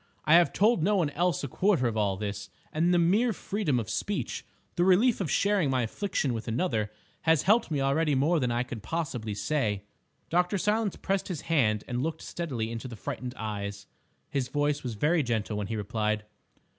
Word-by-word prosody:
I 155 - +5
have 175 0 +6
told 215 -1 +3
no 205 +6 +3
one 165 -7 +1
else 175 0 0
a - - -1
quarter 180 0 +2
of 115 - -2
all 100 -3 +1
this, 100 -1 -4 0.2
and 165 +3 +2
the 175 - +4
mere 200 +8 +3
freedom 180 - -1
of 110 - -4
speech—the 175 - -3
relief 200 +6 +4
of 175 - -1
sharing 200 -3 +2
my 130 -2 +1
affliction 140 - -1
with 115 0 -5
another—has 115 - -1
helped 225 +4 +3
me 145 -4 0
already 145 +2 +2
more 155 +6 +3
than 125 -3 0
I 120 +1 +1
can 120 -2 -7
possibly 120 -6 -3
say." 105 -6 -1 0.5
Dr. 180 +3 +2
Silence 210 +1 +1
pressed 195 0 -1
his 175 -6 -4
hand 115 -11 +1
and 125 0 -2
looked 160 +2 -3
steadily 125 -10 -3
into 115 +2 -5
the 120 - -8
frightened 125 +4 -5
eyes. 100 -2 -4 0.5
His 135 -3 0
voice 145 +1 0
was 120 -3 -4
very 155 +9 +2
gentle 115 -4 -1
when 105 -2 -2
he 110 - -3
replied. 105 0 -1
140 Hz, 190 wpm, -28 LUFS, 110-175 Hz, 0.5 s, have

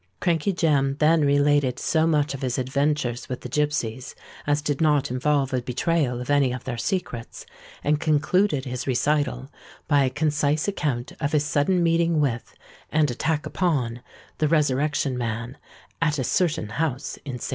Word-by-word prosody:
Crankey 170 +2 +1
Jem 145 -6 +1
then 160 +1 +4
related 145 -2 +3
so 160 -1 +1
much 150 -3 +1
of 140 - -7
his 125 -2 -1
adventures 130 -1 -1
with 125 - -4
the 125 - -7
gipsies 140 -3 -2 0.3
as 145 0 +1
did 145 0 -1
not 145 -4 +2
involve 140 +1 +1
a 130 - +1
betrayal 125 +1 0
of 125 +3 -4
any 140 -3 +3
of 125 -1 -5
their 130 - -4
secrets, 120 -5 -4 0.4
and 150 +1 +2
concluded 155 0 +1
his 125 0 -5
recital 135 0 0 0.4
by 145 -2 +4
a 130 - +2
concise 150 +2 0
account 140 -11 -2
of 145 0 -2
his 150 -1 +2
sudden 170 +5 +1
meeting 165 -1 +2
with, 125 -6 -2 0.4
and 150 -3 +2
attack 150 +5 -1
upon, 130 -10 -1 0.4
the 155 - +2
Resurrection 145 -3 +1
Man 115 +2 -3 0.5
at 150 -2 +1
a 130 - -1
certain 155 - 0
house 135 +2 -2
in 140 - -8
St. 125 - -6
Giles's. - - -4
145 Hz, 170 wpm, -24 LUFS, 130-155 Hz, 0.5 s, then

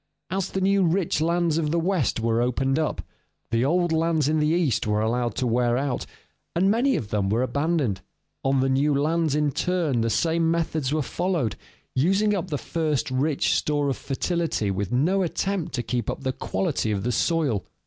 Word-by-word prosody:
As 190 0 -1
the 190 - -3
new 195 +1 +3
rich 170 -2 +1
lands 170 -1 +1
of 155 -2 0
the 170 +2 +1
West 170 - 0
were 115 +1 +1
opened 135 +3 +1
up, 155 - -2 0.5
the 115 +1 +2
old 175 +4 +2
lands 160 -2 +1
in 155 +1 +2
the 150 - +2
East 155 - +1
were 105 0 +1
allowed 120 +1 0
to 130 - -1
wear 120 0 +2
out, 135 -2 -2 0.5
and 190 +3 +3
many 255 +4 +2
of 105 - -3
them 100 -2 0
were 115 +5 +1
abandoned. 140 - 0 0.4
On 135 0 +2
the 135 - +2
new 140 +2 +2
lands 155 +1 +1
in 150 -1 +1
turn 160 -6 0
the 115 - +1
same 165 +7 +1
methods 160 -4 -1
were 155 -1 +1
followed, 170 - -1 0.4
using 195 +10 +2
up 185 -2 -2
the 150 -4 -2
first 150 -4 -1
rich 140 +3 +1
store 145 -1 +1
of 135 - 0
fertility 150 - -1
with 95 0 -3
no 165 +11 +2
attempt 180 -2 -2
to 120 - -2
keep 120 -1 -2
up - - -4
the 130 - -1
quality 95 +2 -2
of 100 -2 -1
the 125 - 0
soil. 135 - +1
150 Hz, 195 wpm, -25 LUFS, 125-170 Hz, 0.5 s, new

